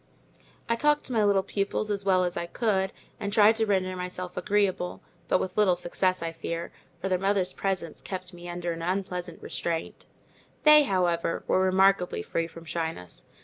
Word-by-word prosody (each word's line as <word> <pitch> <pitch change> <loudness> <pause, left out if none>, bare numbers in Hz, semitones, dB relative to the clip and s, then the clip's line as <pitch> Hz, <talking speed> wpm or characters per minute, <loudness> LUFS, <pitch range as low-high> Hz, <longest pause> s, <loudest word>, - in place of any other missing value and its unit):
I 230 - +2
talked 295 +4 +2
to 255 - -4
my 220 -2 +3
little 200 -2 +3
pupils 200 +2 -2
as 200 -1 -1
well 185 -2 +3
as 175 -1 -2
I 170 - -3
could, 190 -2 0 0.3
and 200 -1 -3
tried 210 +1 +6
to 220 -1 +1
render 185 -2 +1
myself 180 0 -5
agreeable; 200 -4 0 0.2
but - - +3
with 185 0 -4
little 205 -4 +4
success 185 0 0
I 165 - -2
fear, 165 +1 -5 0.3
for 190 - -3
their 185 -1 +1
mother's 195 -1 +1
presence 185 -5 -3
kept 185 -1 -6
me 175 0 -9
under 175 0 -3
an 165 - -7
unpleasant 180 -1 -3
restraint. 165 -1 -4 0.6
They, 300 -1 +8
however, 175 -4 0
were - - +2
remarkably 190 - +3
free 165 - -2
from 165 0 -12
shyness. 160 - -5
185 Hz, 180 wpm, -27 LUFS, 175-200 Hz, 0.6 s, They